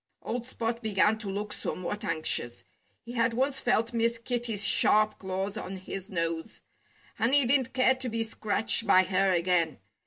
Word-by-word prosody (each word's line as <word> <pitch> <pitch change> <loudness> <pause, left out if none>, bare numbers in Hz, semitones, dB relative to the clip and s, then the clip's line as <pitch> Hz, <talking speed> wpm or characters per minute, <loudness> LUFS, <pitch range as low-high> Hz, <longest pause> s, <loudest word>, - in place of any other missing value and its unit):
Old 240 +1 -4
Spot 235 -1 -3
began 215 0 +2
to 210 -3 -6
look 205 +2 -4
somewhat 205 +4 -4
anxious. 155 - -2 0.4
He 235 - -9
had 230 -1 +1
once 270 +2 +1
felt 230 -1 +1
Miss 230 0 +1
Kitty's 230 -3 -2
sharp 215 +1 +3
claws 190 +2 -3
on 195 -3 -6
his 190 +1 -7
nose. 165 -3 -3 0.6
And 235 +5 +3
he 285 -3 +4
didn't 260 0 +1
care 260 0 +4
to 260 -1 -5
be 225 0 -1
scratched 220 0 +1
by 185 - +6
her 190 +1 +1
again. 170 -2 +1
215 Hz, 165 wpm, -28 LUFS, 190-235 Hz, 0.6 s, by